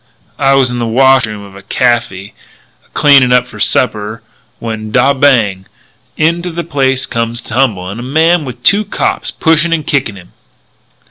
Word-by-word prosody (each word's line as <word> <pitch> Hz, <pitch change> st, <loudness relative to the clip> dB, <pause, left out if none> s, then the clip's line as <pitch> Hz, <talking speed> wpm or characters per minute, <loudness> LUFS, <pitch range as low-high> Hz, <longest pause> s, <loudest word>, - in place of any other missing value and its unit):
"I 135 Hz, -1 st, +3 dB
was 130 Hz, -2 st, +2 dB
in 120 Hz, -, -4 dB
the 120 Hz, -, -2 dB
washroom 120 Hz, -3 st, +2 dB
of 100 Hz, -1 st, -14 dB
a 100 Hz, -, -11 dB
caffy 105 Hz, -3 st, -1 dB, 0.5 s
a -, -, -31 dB
cleanin' 140 Hz, -4 st, +4 dB
up 125 Hz, 0 st, +3 dB
for -, -, -12 dB
supper, 110 Hz, -2 st, 0 dB, 0.3 s
when 110 Hz, -2 st, -6 dB
dod 130 Hz, +4 st, +1 dB
bang! 105 Hz, -9 st, +2 dB, 0.5 s
into 170 Hz, +3 st, 0 dB
the 170 Hz, 0 st, -5 dB
place 135 Hz, -5 st, -1 dB
comes 115 Hz, 0 st, -3 dB
a -, -, -8 dB
tumblin' 110 Hz, -5 st, -2 dB
a -, -, -6 dB
man 160 Hz, +6 st, +1 dB
with 125 Hz, -3 st, -9 dB
two 205 Hz, +1 st, +4 dB
cops 205 Hz, -, -2 dB
pushing 165 Hz, +1 st, +1 dB
and 155 Hz, -3 st, -2 dB
kickin' 135 Hz, -8 st, -1 dB
him. 90 Hz, -2 st, -15 dB
125 Hz, 170 wpm, -12 LUFS, 110-145 Hz, 0.5 s, cleanin